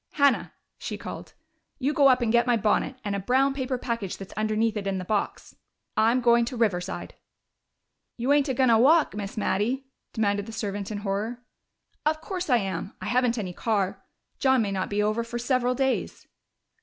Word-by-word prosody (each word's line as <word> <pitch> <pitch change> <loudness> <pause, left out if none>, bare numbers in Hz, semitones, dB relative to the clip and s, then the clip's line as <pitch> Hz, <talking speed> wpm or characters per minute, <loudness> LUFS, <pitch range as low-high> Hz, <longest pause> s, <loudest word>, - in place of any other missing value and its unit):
"Hannah!" 280 -3 +3 0.3
she - - -5
called. - - -8 0.4
"You 285 +1 0
go 280 -2 +5
up 255 -2 +4
and 225 - +1
get 240 +1 +3
my 240 -1 +4
bonnet, 220 +5 +1
and 200 -1 -1
a - - -1
brown 260 +7 +2
paper 260 -1 -2
package 230 -6 -3
that's 195 - -9
underneath 215 +1 0
it 200 -2 -3
in 195 -1 -1
the 185 - -5
box. 210 +1 -2 0.4
I'm 230 +4 +3
going 235 0 +5
to 245 +1 -5
Riverside." 190 -5 -1 1.0
"You 250 +4 +2
ain't 290 -1 +3
a 260 - 0
goin' 255 -1 +4
a 225 - +5
walk, 305 +6 +5
Miss 205 0 -6
Mattie?" 230 +6 0 0.3
demanded 205 -2 0
the 225 - -8
servant 205 -3 -3
in 215 - -4
horror. 215 +5 -3 0.6
"Of 310 +1 +1
course 360 0 -5
I 250 - +5
am. 195 -1 -4
I - - -7
haven't 245 -1 +2
any 190 -5 -3
car. 200 -2 -1 0.4
John 265 -3 +3
may 200 - -2
not 190 -1 -2
be 205 0 0
over 215 +2 0
for 235 +1 -5
several 250 0 +1
days." 265 0 -1
230 Hz, 195 wpm, -26 LUFS, 205-255 Hz, 1.0 s, go